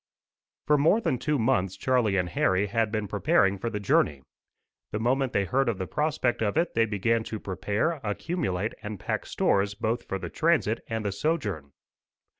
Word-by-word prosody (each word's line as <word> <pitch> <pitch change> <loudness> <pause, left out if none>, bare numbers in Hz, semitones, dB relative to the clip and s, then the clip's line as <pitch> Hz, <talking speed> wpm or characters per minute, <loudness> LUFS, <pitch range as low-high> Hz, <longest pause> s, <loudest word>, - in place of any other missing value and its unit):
For 150 -1 +4
more 165 +10 +4
than 160 - -1
two 150 +3 0
months 100 -6 +1
Charlie 120 -7 +2
and 90 -1 0
Harry 95 +4 +2
had 110 +1 0
been 110 -2 -2
preparing 100 -1 +2
for 115 - -2
the 105 -2 -3
journey. 75 -8 +1 0.7
The 105 - -2
moment 130 +3 +1
they 100 - +1
heard 135 +5 +1
of 110 - -1
the 95 - -3
prospect 150 -2 0
of 110 +5 0
it, 170 +1 +1
they 115 0 +3
began 115 +2 +1
to 110 - -5
prepare, 105 - -1
accumulate, 110 - -2
and 105 -2 -6
pack - - -3
stores 100 +1 +1
both 115 +3 -2
for 95 - -2
the 90 -3 -7
transit 155 -9 +1
and 110 -2 -3
the 100 - 0
sojourn. 100 - -2
110 Hz, 185 wpm, -27 LUFS, 100-130 Hz, 0.7 s, For